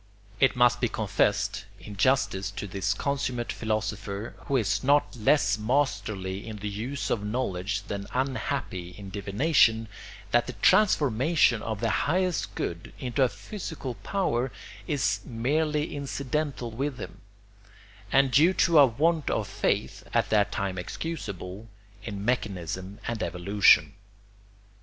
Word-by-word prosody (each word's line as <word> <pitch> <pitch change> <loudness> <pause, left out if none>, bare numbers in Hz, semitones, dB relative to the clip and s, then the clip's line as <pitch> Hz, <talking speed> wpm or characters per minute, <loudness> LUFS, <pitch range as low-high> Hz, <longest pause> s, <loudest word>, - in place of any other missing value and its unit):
It 135 - +4
must 125 0 +4
be - - +2
confessed, - - 0
in 105 - -9
justice 100 -4 +2
to 100 +1 -6
this 100 +1 -1
consummate 130 -2 -2
philosopher, 110 -1 -3
who 140 - +2
is 110 -1 0
not 145 +1 +3
less 110 -1 +3
masterly 105 -6 -1
in 110 - -6
the 105 0 -4
use 120 +7 -4
of 105 - 0
knowledge 105 -3 -2
than 100 0 -5
unhappy 115 -8 -2
in 100 -2 -9
divination, 110 - +2 0.4
that - - +3
the - - -4
transformation 145 - +3
of 110 -2 -4
the 115 -2 +1 0.2
highest 180 0 0
good 85 0 -4
into 130 0 -2
a 130 - +5
physical 130 - -6
power 125 - -1 0.4
is 105 -9 +1
merely 150 +6 -1
incidental 140 -2 -3
with 135 +3 -3
him, 95 +1 -8 0.9
and 135 -1 +4
due 160 +8 +5
to 170 -3 +4
a 140 - +8
want 155 +6 +1
of - - -1
faith - - -1
(at - - +2
that 105 -1 +3
time 95 -2 -2
excusable) 100 - -6 0.4
in 100 -2 -5
mechanism 100 -5 -2
and 115 -2 -3
evolution. 100 +4 +4
115 Hz, 135 wpm, -27 LUFS, 100-140 Hz, 0.9 s, a